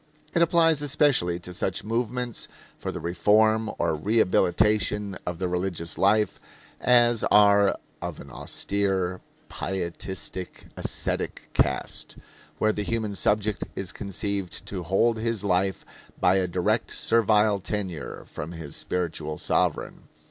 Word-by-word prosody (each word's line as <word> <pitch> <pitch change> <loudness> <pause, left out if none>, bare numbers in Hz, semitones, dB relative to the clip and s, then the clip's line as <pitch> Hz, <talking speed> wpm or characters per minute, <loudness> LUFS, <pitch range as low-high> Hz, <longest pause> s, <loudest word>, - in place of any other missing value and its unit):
It 170 - +2
applies 165 -2 +4
especially 140 - +3
to 90 +1 -8
such 95 0 -2
movements 120 +2 -2 0.3
for - - -3
the - - -5
reform 110 +5 +3
or 80 - +1
rehabilitation 105 +2 +2
of 90 -1 -2
the 90 +1 -1
religious 90 -2 -2
life 105 +2 +2 0.4
as 120 -2 +4
are 100 -1 +5 0.2
of - - -5
an - - -11
austere, 95 -3 -1 0.3
pietistic, 95 0 -4
ascetic - - -3
cast 65 - -1 0.4
where 110 0 +2
the 105 - -2
human 110 0 -2
subject 105 +1 +1
is 95 -1 -3
conceived 100 -1 -4
to 95 -3 -5
hold 95 +7 +2
his 115 -2 -2
life 95 0 0 0.3
by 95 +2 +4
a 95 -1 +1
direct 90 0 0
servile 105 -2 +3
tenure 95 -6 -4
from 80 +4 -7
his 80 -4 -7
spiritual 80 -4 -2
sovereign. - - 0
100 Hz, 125 wpm, -26 LUFS, 90-110 Hz, 0.4 s, are